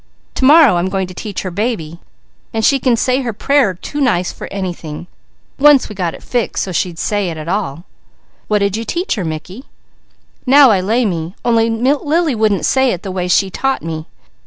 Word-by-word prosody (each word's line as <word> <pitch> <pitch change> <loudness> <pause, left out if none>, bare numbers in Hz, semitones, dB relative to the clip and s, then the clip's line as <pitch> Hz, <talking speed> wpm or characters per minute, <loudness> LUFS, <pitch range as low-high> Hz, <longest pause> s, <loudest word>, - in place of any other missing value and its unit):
To 260 - 0
morrow 285 - +6
I - - +1
am 180 +2 -1
going 190 -1 -1
to 185 - -10
teach 200 +1 -6
her 185 - -4
'baby,' 175 -5 -3 0.6
and 220 - +1
she 275 - +3
can 250 -2 +2
say 255 +3 +1
her 240 -3 -3
prayer 265 -3 +1
too 290 - -6
nice 185 -9 +1
for - - -9
anything, 175 -5 -5 0.5
once 290 -1 +5
we - - -7
got 180 -4 -3
it - - -14
fixed 240 -3 -1
so 190 - -5
she'd 175 -1 -2
say 205 +1 -1
it 165 - -6
at 155 0 -7
all." 175 -5 -3 0.6
"What 210 -1 +1
did 200 0 -1
you 225 - -3
teach 345 +10 -2
her, 200 - -3
Mickey?" 170 - -6 0.8
"'Now 275 -1 +7
I 195 -3 +2
lay 225 +6 +1
me,' 170 -2 -3
only 230 -1 +3
Lily 290 +7 +1
wouldn't 215 -4 +1
say 265 -1 +2
it 180 - -7
the 195 - -5
way 180 -1 -2
She 190 +2 +2
taught 270 +7 -1
me. 160 -1 -5
205 Hz, 205 wpm, -16 LUFS, 180-255 Hz, 0.8 s, Now